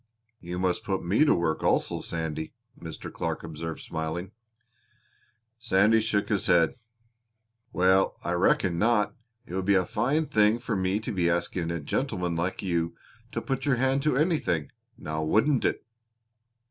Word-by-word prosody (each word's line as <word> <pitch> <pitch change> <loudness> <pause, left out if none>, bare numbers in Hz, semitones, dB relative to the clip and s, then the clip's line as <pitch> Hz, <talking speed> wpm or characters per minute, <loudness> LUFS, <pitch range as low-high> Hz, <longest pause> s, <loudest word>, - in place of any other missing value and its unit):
"You 90 +1 -6
must 90 -1 0
put 95 -2 -2
me 105 - +4
to - - +4
work 80 -2 0
also, - - +1
Sandy," 80 -1 -4 0.2
Mr. - - -8
Clark - - -3
observed, 80 0 -6
smiling. 80 +4 -4 1.3
Sandy 110 +1 +4
shook 105 -2 0
his 100 -3 0
head. 85 -3 +4 1.0
"Well, 95 0 +3
I 85 - -2
reckon 90 0 +2
not. 110 0 +2 0.3
It - - -10
would 95 0 -2
be 100 0 +4
a 90 -1 +3
fine 135 +9 0
thing 105 -3 +3
for 120 -2 -3
me 95 +2 0
to 115 +2 -5
be 90 -4 +1
asking 85 0 -1
a 85 0 -2
gentleman 85 +4 -2
like 90 +4 -2
you 85 -2 -1 0.4
to - - -3
put 135 -1 -2
your 135 - +4
hand 135 +2 +1
to 150 -3 +1
anything, 150 - 0 0.3
now 80 0 -4
wouldn't 110 - +2
it!" - - -1
95 Hz, 160 wpm, -27 LUFS, 85-110 Hz, 1.3 s, me